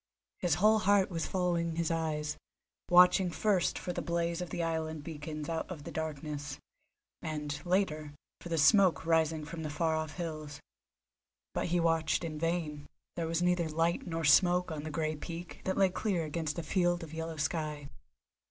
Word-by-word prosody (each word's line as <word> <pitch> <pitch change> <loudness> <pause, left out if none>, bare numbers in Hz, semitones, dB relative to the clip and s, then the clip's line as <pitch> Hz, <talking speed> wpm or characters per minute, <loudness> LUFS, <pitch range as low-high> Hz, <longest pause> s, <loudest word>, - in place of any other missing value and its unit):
His 175 -5 +2
whole 215 +4 +5
heart 200 -2 +3
was 165 -2 -2
following 170 -3 0
his 170 0 0
eyes, 155 -2 -1 0.5
watching 180 +1 +6
first 190 0 +1
for 180 - -4
the - - -3
blaze 170 0 -1
of 180 - -4
the 170 - -2
island 160 -2 -2
beacons 150 -1 -6
out 165 -1 -3
of 165 -6 -7
the - - -7
darkness, 150 -2 -4 0.6
and, 150 -2 -4
later, 155 -6 0 0.2
for 175 - -9
the 165 - 0
smoke 180 +2 +5
rising 160 -1 +2
from 160 +2 -6
the 155 - -3
far 160 +2 0
off 155 -1 -3
hills. 155 -4 -5 0.9
But - - -1
he 175 +1 +1
watched 165 0 +2
in 155 -2 -4
vain; 160 -3 -2 0.3
there 170 -2 -2
was 165 +1 0
neither 175 -2 +2
light 165 +3 0
nor 165 -1 -2
smoke 180 +3 +5
on 155 -2 -4
the 155 - -5
grey 155 0 -1
peak 170 +3 -7
that 190 - 0
lay 195 -1 +5
clear 180 -2 -1
against 155 -1 -3
a 170 - -2
field 175 +1 +1
of 160 -1 -9
yellow 160 0 -4
sky. 150 -1 -2
165 Hz, 180 wpm, -32 LUFS, 155-175 Hz, 0.9 s, watching